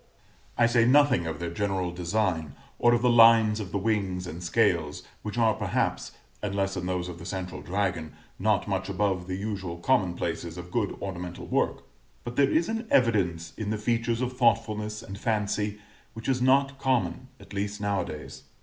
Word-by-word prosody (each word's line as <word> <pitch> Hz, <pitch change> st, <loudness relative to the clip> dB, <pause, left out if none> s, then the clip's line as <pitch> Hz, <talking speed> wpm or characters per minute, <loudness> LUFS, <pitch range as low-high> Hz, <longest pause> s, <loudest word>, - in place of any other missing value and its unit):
] -, -, -32 dB
I 120 Hz, -, +5 dB
say 120 Hz, 0 st, +4 dB
nothing 130 Hz, -, +4 dB
of 80 Hz, -2 st, -3 dB
their 85 Hz, -1 st, -3 dB
general 95 Hz, -1 st, -1 dB
design, 90 Hz, -4 st, -1 dB, 0.2 s
or 120 Hz, 0 st, +5 dB
of 120 Hz, -, -1 dB
the 125 Hz, -, +5 dB
lines 115 Hz, -2 st, +6 dB
of 100 Hz, -4 st, -5 dB
the -, -, 0 dB
wings 95 Hz, -3 st, -1 dB
and 85 Hz, -1 st, -7 dB
scales, 85 Hz, -5 st, +1 dB, 0.2 s
which 105 Hz, +2 st, -5 dB
are 115 Hz, -2 st, +4 dB
perhaps, -, -, -1 dB, 0.3 s
unless 100 Hz, -1 st, -1 dB
in 90 Hz, -1 st, -3 dB
those 90 Hz, -1 st, -1 dB
of 85 Hz, -1 st, -8 dB
the 85 Hz, -, -9 dB
central 95 Hz, -2 st, -5 dB
dragon, 90 Hz, -4 st, -2 dB, 0.3 s
not 105 Hz, +1 st, +1 dB
much 95 Hz, -1 st, -2 dB
above 95 Hz, -2 st, 0 dB
the 95 Hz, 0 st, -3 dB
usual 95 Hz, -4 st, -4 dB
commonplaces 85 Hz, -5 st, 0 dB
of 90 Hz, 0 st, -8 dB
good 110 Hz, -5 st, -1 dB
ornamental 90 Hz, -2 st, -5 dB
work; -, -, 0 dB, 0.4 s
but 120 Hz, 0 st, -6 dB
there 140 Hz, -1 st, +4 dB
is 165 Hz, +1 st, +2 dB
an 225 Hz, +1 st, -3 dB
evidence 90 Hz, -10 st, +2 dB
in 110 Hz, -2 st, -3 dB
the 110 Hz, -, 0 dB
features 115 Hz, +2 st, 0 dB
of 125 Hz, 0 st, -2 dB
thoughtfulness 110 Hz, -3 st, +1 dB
and 100 Hz, +1 st, -8 dB
fancy 105 Hz, -2 st, -1 dB, 0.4 s
which 115 Hz, 0 st, -8 dB
is 130 Hz, -2 st, +1 dB
not 135 Hz, +1 st, +3 dB
common, 130 Hz, -1 st, 0 dB
at 100 Hz, 0 st, -13 dB
least 100 Hz, +1 st, -3 dB
now 100 Hz, -2 st, 0 dB
a -, -, -3 dB
days. 75 Hz, 0 st, -8 dB
105 Hz, 185 wpm, -27 LUFS, 90-115 Hz, 0.4 s, lines